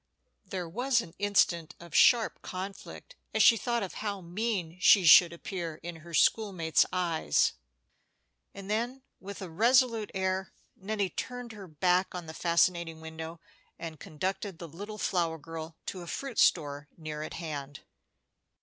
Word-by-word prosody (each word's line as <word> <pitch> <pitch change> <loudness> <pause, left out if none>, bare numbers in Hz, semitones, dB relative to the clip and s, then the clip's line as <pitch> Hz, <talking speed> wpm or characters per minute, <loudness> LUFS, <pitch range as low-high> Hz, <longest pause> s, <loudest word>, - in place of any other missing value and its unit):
There 185 -3 -5
was 245 +7 +1
an 165 - -11
instant 175 -5 +2
of 170 -2 -13
sharp 235 -3 +5
conflict 195 - -8 0.2
as 220 - +5
she 230 - +8
thought 235 0 -1
of 190 - -5
how 205 -2 -4
mean 180 -1 -3
she 185 0 +6
should 170 +1 +9
appear 170 -2 -5
in 170 -1 -6
her 170 +1 -8
school 215 +4 +3
mates' 165 -3 +2
eyes, 170 - +1 1.0
and 195 -1 -10
then, 240 +5 -2 0.2
with 200 +1 -8
a 185 - -7
resolute 230 +3 +3
air, 190 0 -1 0.2
Nettie 200 -1 -2
turned 245 +3 -5
her 205 -3 -10
back 180 +4 +1
on 175 -2 -5
the 160 - -8
fascinating 170 -1 +1
window, 160 +1 -8 0.4
and 160 -3 -7
conducted 190 +4 -4
the 170 - -8
little 205 +7 -8
flower 170 -5 0
girl 160 +1 -8
to 185 - -5
a 175 - -9
fruit 270 +2 -4
store 145 -3 +2
near 155 -2 -6
at 155 - -6
hand. 145 -4 -6
180 Hz, 155 wpm, -30 LUFS, 165-205 Hz, 1.0 s, should